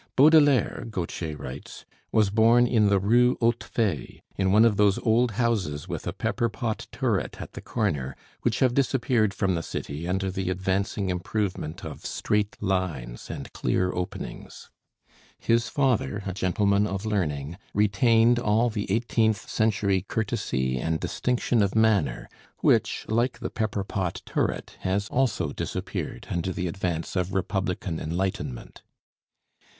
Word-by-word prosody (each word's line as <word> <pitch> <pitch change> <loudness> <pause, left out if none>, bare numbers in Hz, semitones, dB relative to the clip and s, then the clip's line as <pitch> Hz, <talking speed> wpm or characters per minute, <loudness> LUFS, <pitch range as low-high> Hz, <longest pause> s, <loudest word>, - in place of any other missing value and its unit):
Baudelaire, 145 -4 +5
Gautier 85 -6 -4
writes, 70 0 -8 0.3
was 105 -3 +3
born 115 +3 +5
in 110 -4 +3
the 100 - +4
Rue 120 +6 +3
Hautefeuille, 115 - -1
in 95 -1 +1
one 110 +3 +6
of 115 -3 +4
those 100 -1 +4
old 115 +1 +2
houses 100 - -1
with - - -5
a - - 0
pepper 120 - -1
pot 110 +1 -3
turret - - -1
at - - -8
the - - -7
corner 70 -1 -2 0.3
which - - 0
have 130 -2 +4
disappeared 125 -5 +2
from 95 -1 0
the 85 - -1
city 80 0 -5
under 95 +1 -1
the 95 -1 -2
advancing 95 +2 -1
improvement 90 -2 -3
of 80 - -8
straight 105 -1 -1
lines 90 -12 -2
and - - -7
clear 90 0 0
openings. 90 0 -6 0.7
His 115 +1 +1
father, 115 - 0
a 95 - -3
gentleman 100 +2 +2
of 100 +1 -4
learning, 85 -6 -2 0.2
retained 115 +3 +4
all 115 +1 +2
the 105 -3 -3
eighteenth 110 -1 +1
century 105 -3 +1
courtesy 65 - -1
and 80 +4 -1
distinction 115 +5 0
of 100 0 +1
manner, 100 - +2 0.3
which, - - +2
like 120 +2 +1
the 120 0 -5
pepper 105 -3 -1
pot 95 -3 -3
turret, - - -2
has 100 +2 -1
also 120 - +1
disappeared - - -4
under 85 +1 -1
the 90 0 -3
advance 85 -1 -3
of 90 +1 -1
Republican 90 -3 -1
enlightenment. 85 -6 -3
100 Hz, 140 wpm, -26 LUFS, 90-115 Hz, 0.7 s, one